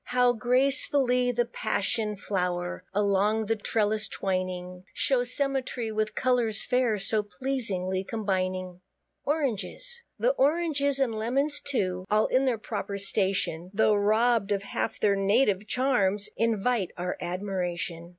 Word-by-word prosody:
How 250 0 +3
gracefully 250 +1 +2
the 240 0 +1
Passion 215 -1 -1
flow'r, 180 -3 -2
Along 205 +2 +1
the 225 +2 +1
trellis 215 0 0
twining, 185 -1 -3
Shows 250 -3 +1
symmetry, 265 -5 -1
with 215 0 -1
colours 240 -4 +1
fair, 250 -3 +1
So 210 +2 +1
pleasingly 195 -4 -2
combining. 185 -3 -2 0.4
ORANGES. 310 - -2 0.2
The - - +3
Oranges, 285 -2 +2
and 265 -4 +1
Lemons 270 +7 0
too, 185 -9 -1
All 215 +1 +3
in 260 +1 +2
their 250 -3 +1
proper 205 -2 -4
station, 190 -4 0
Tho' 215 0 +4
robb'd 215 +1 +2
of 200 -1 0
half 210 - -3
their 200 -1 +3
native 200 0 +2
charms, 210 -7 +1
Invite 225 -2 +1
our 180 +1 -2
admiration. 175 -2 -3
215 Hz, 125 wpm, -27 LUFS, 195-250 Hz, 0.4 s, Tho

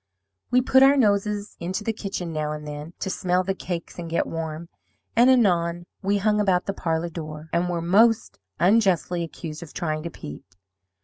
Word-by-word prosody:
We 250 - +4
put 265 +1 +4
our 275 +1 +7
noses 205 -3 +1
into 185 +4 -3
the 225 - -1
kitchen 190 -5 -5
now 150 -1 -2
and 150 0 -7
then, 150 +3 -7
to 190 - -2
smell 180 0 +1
the 195 +1 -1
cakes 175 -2 -6
and 170 -1 -5
get 165 - +1
warm, 165 0 -5 0.5
and 240 +3 +6
anon 175 -8 +3 0.2
we 200 +1 +1
hung 210 +1 +2
about 190 -3 +2
the 195 - -2
parlour 165 -2 -1
door, 155 -1 -8
and 175 +1 +1
were 170 -1 -2
most 220 +6 +3 0.2
unjustly 185 -3 +3
accused 160 -1 -7
of 170 - -10
trying 155 -3 -2
to 170 - -5
peep. 75 - -9
175 Hz, 185 wpm, -24 LUFS, 165-205 Hz, 0.5 s, our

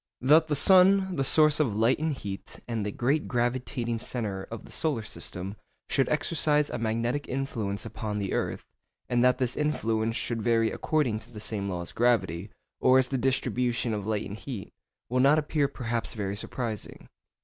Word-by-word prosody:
That 155 +5 +5
the 150 - 0
sun, 190 +4 +5
the 135 - +1
source 155 +2 +5
of 125 -9 +1
light 115 +5 +3
and 160 +1 0
heat, 100 -7 -7
and 115 -3 -2
the 105 - -2
great 140 +8 0
gravitating 120 -1 -1
centre 105 -6 -4
of 115 - -7
the - - -14
solar 145 -8 -1
system, 95 -1 -6 0.3
should 135 - +2
exercise 150 -1 +1
a 120 - -3
magnetic 115 +5 -1
influence 115 -7 -3
upon 105 -2 -4
the 100 -2 -2
earth, - - -2 0.4
and 120 0 +2
that 125 0 +4
this 125 -2 -1
influence 115 -7 0
should 115 -2 -2
vary 115 0 +2
according 135 -9 0
to 115 +2 -15
the 110 - -9
same 100 -2 -2
law 90 -2 -3
as - - -5
gravity, 110 -6 +1 0.3
or 130 0 +5
as 130 -1 +2
the 135 - 0
distribution 125 -2 0
of 105 -1 -4
light 110 -1 -1
and 100 - -7
heat, 115 -5 -7 0.4
will 125 +2 0
not 140 +4 +5
appear 150 -1 +1
perhaps 120 -5 -3
very 100 -2 -3
surprising. 115 0 -5
120 Hz, 180 wpm, -28 LUFS, 110-140 Hz, 0.4 s, That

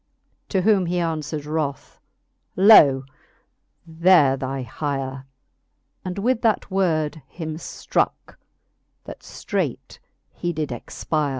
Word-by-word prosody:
To 190 -3 0
whom 195 -3 +3
he 175 - -1
aunfwered 160 -3 -2
wroth, 150 -2 -4 0.6
Loe 150 -10 +7 0.8
there 165 -4 +4
thy 135 0 -4
hire; 135 0 -4 0.8
And 185 0 -5
with 235 +4 0
that 220 -3 0
word 160 -5 0
him 160 -2 -6
ftrooke, 165 - -3 0.7
that - - -10
ftreightjhe - - -4 0.6
did 150 -3 -3
expire. 150 +5 -3
155 Hz, 100 wpm, -22 LUFS, 140-185 Hz, 0.8 s, Loe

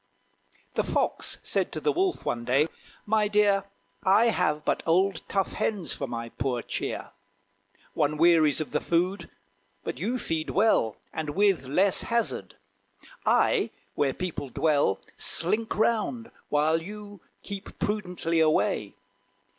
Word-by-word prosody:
The - - +1
Fox - - 0
said - - 0
to - - -2
the 440 - +1
Wolf, 370 -1 0
one 120 0 -1
day, 135 +6 +3 0.4
"My 215 0 +2
dear, 205 -1 +3 0.4
I 210 +4 +5
have 155 -7 0
but - - +1
old 185 +1 +2
tough 195 -1 0
hens 200 -6 -2
for 140 - -4
my 115 -1 -5
poor 125 -1 -2
cheer! - - -4 0.8
One 150 0 +1
wearies 160 -3 +5
of 155 - -4
the - - +1
food; 175 +1 0 0.5
but - - -4
you 230 +9 -1
feed 160 -9 -2
well, 195 - +2 0.2
And 155 -2 -3
with 195 -10 +3
less 185 +8 +3
hazard. 235 -1 -2 0.7
I, - - +3 0.2
where 135 -2 0
people 170 -6 -4
dwell, 145 -7 +2 0.2
Slink 215 +7 +1
round, 230 +1 0 0.2
while 155 +2 +2
you 205 +1 -9 0.2
keep 200 -1 -8
prudently 180 -5 -1
away. 155 -1 +2
180 Hz, 135 wpm, -27 LUFS, 150-210 Hz, 0.8 s, I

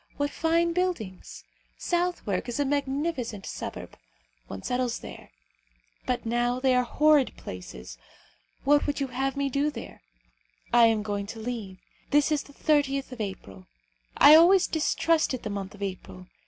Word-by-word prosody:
What 285 0 -1
fine 335 +1 +1
buildings! 335 - -3 0.3
Southwark 345 - -1
is 240 - -3
a 285 - +2
magnificent 275 -5 -2
suburb. - - -7 0.5
One 95 +6 -8
settles 250 -1 -1
there. - - -10 0.8
But 250 -1 -1
now 240 +2 0
they 260 0 +2
are 250 - +4
horrid 295 +2 +3
places. 60 -9 -9 0.6
What 290 +2 +3
would 290 - -1
you 275 -1 -2
have 270 +2 -2
me 280 0 0
do 280 +2 0
there? 250 -6 -9 0.7
I 235 -1 +7
am 220 -2 +1
going 205 -1 -3
to 225 - -8
leave. 220 -5 -5 0.3
This 295 +1 +3
is 300 -2 +1
the 285 - -16
30th 275 -3 +1
of 245 -3 -6
April. 100 - -7 0.5
I 300 - +9
always 345 +4 +7
distrusted 315 -3 0
the 210 - -4
month 200 0 -5
of 200 - -7
April. 95 - -7
255 Hz, 155 wpm, -27 LUFS, 210-295 Hz, 0.8 s, I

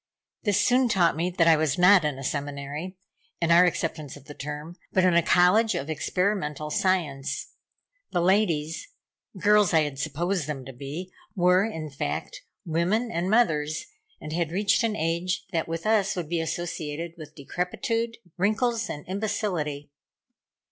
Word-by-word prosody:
This 205 -2 +1
soon 250 +1 +3
taught 175 -7 +3
me 170 +3 0
that 175 -2 +2
I 165 - +7
was 155 -2 0
not 180 0 +6
in 150 -3 -1
a 135 - -7
seminary 145 +6 -4 0.4
in 170 0 +1
our 175 +2 +7
acceptance 155 -5 -2
of 145 - -16
the 145 - -9
term 150 +4 -7 0.2
but 185 - +3
in 185 -1 +4
a 170 - +5
College 180 +7 +4
of 140 +4 -3
Experimental 155 -3 -1
Science. 155 -7 -1 0.6
The - - 0
ladies 170 -4 +1 0.5
girls 205 -1 +4
I 160 - +6
had 145 -3 -3
supposed 160 +3 -1
them 135 -4 -5
to 135 - -9
be 145 +8 -7 0.2
were, 180 0 +4
in 160 -8 -4
fact, - - -4 0.2
women 185 +9 0
and 175 +2 -1
mothers, 155 -9 +2 0.3
and 155 - -7
had 170 -1 0
reached 200 +3 +2
an 225 -2 0
age 170 +1 -1
that 165 -3 -1
with 165 0 -4
us 215 -2 +2
would 170 -4 -4
be 170 -1 0
associated 165 -1 -4
with 155 -4 -11
decrepitude, 230 - -2 0.2
wrinkles 225 +4 +1
and 150 - -6
imbecility. 175 -8 -2
170 Hz, 160 wpm, -26 LUFS, 150-195 Hz, 0.6 s, I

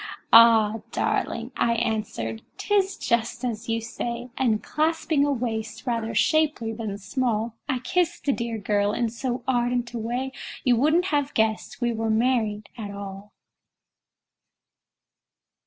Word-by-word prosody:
"Ah! 225 -1 +7
darling," 235 +2 -1
I 235 - +2
answered, 215 - -2 0.2
"'tis 395 -2 +1
just 235 +2 -1
as 230 -1 -4
you 225 0 +1
say;" 235 +1 -5
And 225 -5 +1
clasping 315 -1 +1
a 290 - +2
waist 225 -3 -3
rather 230 -2 -2
shapely 290 -2 +2
than 215 -3 -4
small, 225 +1 -1 0.2
I 260 - +1
kissed 345 +7 -1
the 285 - +3
dear 235 -2 -3
girl 205 0 +1
in 235 0 0
so 245 +2 -3
ardent 245 -1 0
a 235 - -3
way 245 +4 -2 0.3
You 250 -2 +4
wouldn't 310 +8 +3
have 290 0 0
guessed 220 +3 0
we 240 -1 +1
were 225 0 -2
married 220 -2 +1
at 220 -4 -6
all! 200 0 -8
235 Hz, 140 wpm, -25 LUFS, 220-255 Hz, 0.3 s, Ah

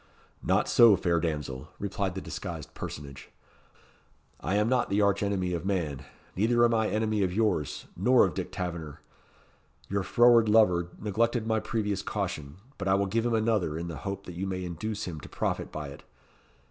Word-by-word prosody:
"Not - - +2
so, 115 -4 +7
fair 85 -3 +1
damsel," 75 -6 -3
replied 100 -2 -2
the 95 - -4
disguised - - -6
personage; 70 -2 -8 1.1
"I 95 - -1
am 105 +1 +3
not 125 0 +1
the 100 +1 +1
arch 100 -1 +3
enemy 95 -3 0
of 85 -2 -3
man, 85 -9 -2 0.3
neither 120 +4 +3
am 120 - +2
I 110 -1 +2
enemy 110 -1 0
of 95 -2 +1
yours, 105 -8 0
nor 125 0 +5
of - - -2
Dick - - -4
Taverner. 85 -5 -5 0.9
Your 100 0 0
froward 120 +2 +5
lover 90 -6 +4
neglected 115 +3 0
my 110 0 +1
previous 105 -4 -2
caution, 70 -1 -4 0.2
but 95 - -3
I 95 - +4
will 100 0 +2
give 115 +4 0
him 115 - +1
another, 110 -8 +1
in 85 +1 -4
the 80 - -6
hope 100 +4 -5
that 90 - -8
you 95 +3 -3
may 95 -1 -3
induce 100 +5 -4
him 80 -4 -5
to - - -11
profit - - -2
by 75 -2 -5
it. 70 - -11
100 Hz, 185 wpm, -28 LUFS, 85-110 Hz, 1.1 s, so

